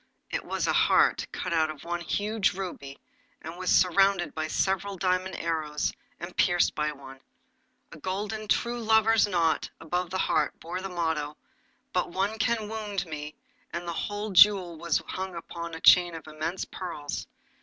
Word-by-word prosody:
It - - -2
was - - -2
a - - +1
heart - - +4
cut - - -3
out 160 -1 +2
of 155 -2 -8
one 175 0 -3
huge 205 +3 0
ruby, 175 -7 -6 0.4
and 165 +2 -8
was 185 +1 -3
surrounded 185 -2 +4
by 155 0 -2
several 195 +3 0
diamond 185 +1 0
arrows, 155 -3 -1 0.3
and 175 +1 -7
pierced 175 -2 +3
by 150 0 -1
one. 135 -2 -12 0.7
A 160 - -11
golden 210 +5 -3
true 235 +3 0
lover's 220 0 +4
knot 170 -4 +1
above 175 +2 -2
the 185 - -2
heart 155 -5 +1
bore 175 +3 -5
the 195 - -5
motto, 160 -4 -2 0.6
'But - - 0
one 195 +5 -1
can 220 0 +1
wound 210 -3 -3
me,' 150 -2 -7 0.4
and 175 +1 -5
the 170 - -2
whole 205 +4 -3
jewel 190 -2 +6
was 165 0 0
hung 190 -1 -5
upon 170 0 -6
a - - -7
chain 175 -2 +6
of 160 - -8
immense 155 +4 -3
pearls. 160 -6 -6
175 Hz, 165 wpm, -28 LUFS, 160-195 Hz, 0.7 s, jewel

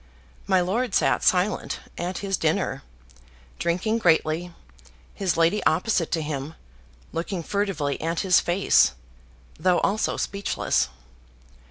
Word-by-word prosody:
My 190 -2 +4
lord 225 +8 -1
sat - - +2
silent 185 +3 +1 0.2
at 180 +2 -4
his 195 -1 +1
dinner, - - -1 0.8
drinking 185 +7 0
greatly, 165 -1 +2 0.6
his 185 -5 -1
lady 170 +5 +2
opposite 175 +1 +1
to 160 -2 0
him, 150 0 -5 0.6
looking 170 +1 -3
furtively 190 -8 -2
at 165 +1 -1
his 185 -2 +5
face, 175 - +3 0.7
though 180 -1 +3
also 210 +2 0
speechless. 200 0 -1
180 Hz, 115 wpm, -25 LUFS, 165-200 Hz, 0.8 s, his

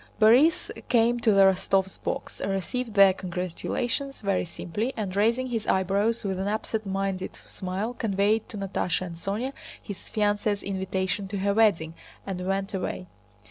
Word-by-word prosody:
Borís 245 +9 +5 0.2
came 240 0 +3
to 230 -2 +3
the 195 -1 +5
Rostóvs' 190 0 +2
box, - - -4
received 215 +4 -2
their 195 -1 +7
congratulations 185 +9 -3
very 195 -3 0
simply, 205 +9 -4
and 200 -4 -3
raising 230 +5 +2
his 225 -3 -2
eyebrows 200 +5 +1
with 190 -2 -2
an 190 - -1
absent 215 0 -2
minded 195 -1 -2
smile 195 +5 -3
conveyed 210 -1 +1
to 215 - -7
Natásha 190 -2 -1
and 170 -2 -7
Sónya 205 +10 -3 0.3
his 200 -3 -8
fiancée's 205 -1 0
invitation 190 0 -2
to 200 +1 -4
her 200 +1 +1
wedding, 200 -7 +3 0.3
and 185 -2 -4
went 195 +1 -1
away. 185 -1 -3
200 Hz, 150 wpm, -27 LUFS, 190-220 Hz, 0.3 s, their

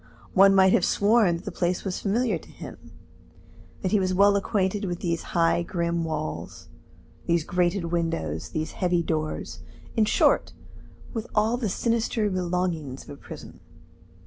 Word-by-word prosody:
One 195 0 +6
might 190 0 +6
have - - +3
sworn 205 -3 +3
that 170 - -8
the - - -4
place 175 0 -1
was 185 -2 -2
familiar 230 +4 0
to - - -17
him, - - -11 0.9
that 185 - 0
he 210 - +4
was 185 -1 0
well 200 +1 +5
acquainted 200 0 0
with 175 -2 -4
these 170 -2 -1 0.2
high 165 0 +3
grim 170 -1 -1
walls, 155 - -5 0.6
these 170 -1 +2
grated 175 0 0
windows, 165 - -2
these 155 0 -3
heavy 175 -2 0
doors 155 - -3 0.4
in 220 - +4
short, - - +3 0.6
with 225 -2 -4
all 220 +2 +3
the 240 -4 -2
sinister 225 0 0
belongings 175 -6 -2
of - - -12
a - - -7
prison. - - -11
180 Hz, 155 wpm, -26 LUFS, 170-205 Hz, 0.9 s, One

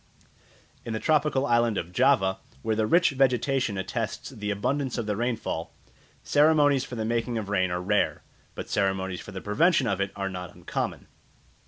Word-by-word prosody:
In 115 - -4
the 110 - -2
tropical 150 -2 +2
island 120 -4 +2
of 85 - -4
Java, 95 -4 +3 0.2
where 110 - 0
the 110 0 +1
rich 170 +6 +4
vegetation 130 -4 +1
attests 105 +7 -4
the 105 -5 -5
abundance 130 +6 -1
of 120 - -2
the 105 -1 -1
rainfall, 115 -7 -3 0.5
ceremonies 145 -2 +4
for 130 - -7
the 110 -1 -2
making 115 +1 -1
of 105 -3 -4
rain 95 -3 +1
are 90 0 -2
rare, 105 +2 +1 0.3
but - - -6
ceremonies 95 -2 -1
for - - -10
the 95 -1 -6
prevention 145 - +3
of 100 -3 0
it 100 0 -1
are 100 -1 -2
not 90 -2 -7
uncommon. - - -4
110 Hz, 175 wpm, -27 LUFS, 100-130 Hz, 0.5 s, rich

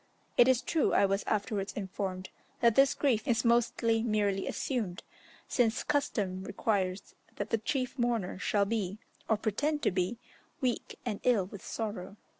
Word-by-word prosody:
It 245 - +7
is 260 -1 +3
true, 320 -3 +1
I - - +5
was 195 +1 0
afterwards 205 -2 -1
informed 190 -1 -4 0.3
that 235 -2 +5
this 275 +4 +5
grief 255 -4 +1
is 235 -2 +2
mostly 230 -1 +3
merely 205 -4 0
assumed, 220 -10 -2 0.4
since 235 -2 +1
custom 205 -10 -1
requires 195 -2 -1 0.2
that - - -4
the 225 - +2
chief 255 +3 -2
mourner 230 -7 0
shall 200 0 +2
be, 200 -2 -2 0.3
or 220 - +4
pretend 290 +9 -1
to - - +3
be, 185 +5 -1 0.4
weak 255 -4 -2
and 215 -4 -2
ill 230 -7 +3
with 195 +1 -10
sorrow. 205 -3 -5
215 Hz, 155 wpm, -31 LUFS, 195-240 Hz, 0.4 s, It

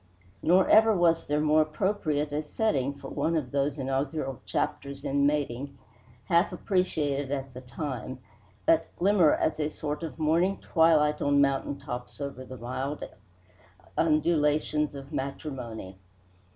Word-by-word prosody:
Nor 180 +3 +4
ever 220 -1 +6
was 165 -1 +2
there 150 +1 +1
more 155 +1 +4
appropriate 155 -2 -1
a 150 +1 -1
setting 145 - -1
for 140 -1 -9
one 165 - 0
of 130 -5 -3
those 140 +1 0
inaugural 135 0 -2
chapters 140 0 -3
in 140 +1 +2
mating, 140 -2 -2 0.5
half 170 +3 +3
appreciated 150 -7 -1
at 135 -2 -3
the 125 - -8
time, 130 -1 -5 0.5
that 165 +5 +2
glimmer 185 -4 +4
as 155 - -1
a 150 0 0
sort 150 0 -4
of 165 -2 -6
morning 165 +5 +2
twilight 155 -3 +3
on 145 0 +3
mountain 140 0 +1
tops 125 +2 -7
over 140 -2 -5
the 130 0 -9
mild 130 +4 -4 0.9
undulations 150 -1 +2
of 140 +2 -9
matrimony. 125 -8 -5
145 Hz, 140 wpm, -28 LUFS, 135-160 Hz, 0.9 s, ever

